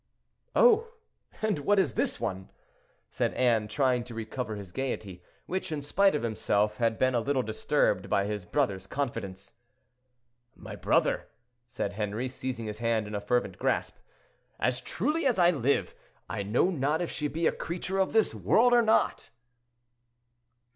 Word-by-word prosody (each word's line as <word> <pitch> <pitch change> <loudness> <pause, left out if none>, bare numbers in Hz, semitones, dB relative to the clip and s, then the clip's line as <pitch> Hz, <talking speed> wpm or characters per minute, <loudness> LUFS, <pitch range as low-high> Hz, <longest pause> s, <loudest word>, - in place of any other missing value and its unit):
"Oh! 460 -2 +5 0.6
and 215 -7 +1
what 205 +8 +2
is 170 - +2
this - - -1
one?" 95 0 -4 0.6
said - - -1
Anne, 115 -4 +2
trying 125 +1 +1
to 120 -2 -9
recover 110 0 -4
his 100 -3 -9
gayety, 100 -7 -4 0.2
which, 185 -2 -3
in 155 - -2
spite 195 +6 +2
of 150 - -2
himself, 105 -2 0
had 115 -2 +1
been 130 0 +2
a 120 - +2
little 135 +1 0
disturbed 110 -4 0
by 100 - +2
his 105 -1 -3
brother's 95 -3 -1
confidence. 115 -9 -4 1.0
"My - - -9
brother," - - +1 0.4
said 100 -4 -3
Henri, 105 +4 -2
seizing 125 -2 -5
his 105 0 -6
hand 115 -2 +1
in 105 - -8
a 100 - -2
fervent 105 -4 -1
grasp, - - 0 0.6
"as 125 +1 0
truly 295 - 0
as 245 - +1
I 175 -1 +5
live, 140 -3 0 0.3
I - - -3
know 110 - +2
not 150 -1 0
if 170 - -4
she 150 - -2
be 165 +3 -2
a - - +4
creature 180 +3 -3
of 190 - +2
this 220 -1 +3
world 245 +2 +3
or 240 - +6
not." 220 - +1
125 Hz, 160 wpm, -29 LUFS, 105-165 Hz, 1.0 s, or